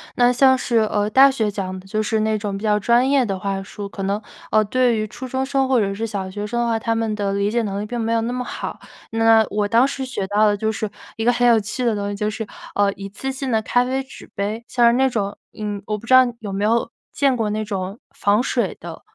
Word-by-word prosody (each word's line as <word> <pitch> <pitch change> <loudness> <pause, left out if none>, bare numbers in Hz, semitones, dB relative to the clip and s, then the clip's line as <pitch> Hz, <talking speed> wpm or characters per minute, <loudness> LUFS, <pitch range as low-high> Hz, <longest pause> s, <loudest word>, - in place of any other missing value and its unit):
那 245 -1 +4
像 260 +1 +5
是， 245 -2 0
呃， 210 -1 +1
大 270 +5 +7
学 225 -5 0
讲 190 -2 -4
的 190 - -15
就 215 +2 -1
是 220 +1 0
那 215 0 +1
种 205 -1 -4
比 195 - -6
较 210 -1 +3
专 240 +4 +3
业 275 -2 +3
的 195 -3 -2
话 195 0 -2
术。 200 +1 -7
可 195 - -6
能， 200 +2 -1 0.3
呃， 215 0 +4
对 250 +2 +2
于 215 0 -1
初 250 +5 -8
中 260 +1 -1
生 270 0 +1
或 260 -2 +3
者 200 -2 0
是 220 +3 -3
小 200 -4 -4
学 205 +2 -5
生 240 +3 -1
的 235 - 0
话， 230 -1 +1
他 230 +1 -1
们 225 -1 -1
的 200 -1 -1
理 200 +1 +1
解 235 +2 0
能 200 -1 -3
力 - - -4
并 240 +2 -4
没 225 0 0
有 230 - +2
那 230 +2 -2
么 250 0 -3
好。 - - -6 0.3
那 225 0 +4
我 205 0 0
当 235 +5 +4
时 275 -1 -4
学 225 -7 -4
到 205 +2 +3
的 205 -1 +3
就 220 +2 -1
是 215 0 -3 0.3
一 225 - -3
个 245 - +4
很 245 0 +3
有 230 -2 +6
趣 215 +4 -4
的 230 -3 +2
东 200 -1 -3
西， 205 - -3
就 210 +1 -1
是， 220 +1 -4 0.3
呃， 200 -1 +2
一 195 0 -8
次 270 +7 -4
性 265 0 -4
的 225 -3 +2
咖 245 +2 +2
啡 260 +2 -1
纸 270 - -13
杯， 210 +3 -3
像 240 -2 +2
是 235 - +5
那 265 +1 +3
种 205 -4 -2 0.2
嗯， 210 -2 -4
我 210 0 -1
不 215 - -12
知 255 - +1
道 255 0 +8
你 240 - -4
有 205 -3 -5
没 195 +1 -2
有 230 +2 +1 0.2
见 275 -2 +2
过 225 -3 -1
那 215 +1 -2
种 195 +1 -4 0.2
防 205 +4 +2
水 240 -7 -1
的， 170 -2 -9
220 Hz, 300 characters per minute, -21 LUFS, 205-245 Hz, 0.3 s, 道